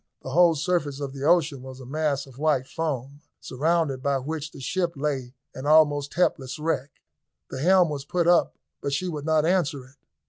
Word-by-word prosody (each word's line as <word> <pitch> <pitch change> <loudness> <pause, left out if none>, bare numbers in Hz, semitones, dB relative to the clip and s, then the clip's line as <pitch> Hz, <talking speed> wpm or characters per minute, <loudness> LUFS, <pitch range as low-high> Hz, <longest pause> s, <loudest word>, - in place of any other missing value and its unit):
The 130 - -6
whole 170 +2 +5
surface 150 -3 -1
of 140 -2 -5
the 135 0 -7
ocean 155 -5 +3
was 130 0 -10
a 130 - -10
mass 150 +1 -1
of 135 -1 -15
white 150 -4 +2
foam, 140 -2 -4 0.2
surrounded 150 -1 0
by 140 0 +1
which 150 +3 -4
the - - -13
ship 170 +5 -1
lay 135 -3 -3 0.2
an 130 +2 -6
almost 145 -2 +4
helpless 140 -6 0
wreck. 150 -3 -1 0.6
The 130 - -5
helm 180 +1 +5
was 145 -2 -4
put 170 +3 0
up 175 -1 +4 0.3
but 140 - -2
she 180 +6 -1
would 150 -4 -5
not 160 -1 +2
answer 155 -7 0
it. 135 +2 -21
145 Hz, 195 wpm, -25 LUFS, 135-160 Hz, 0.6 s, whole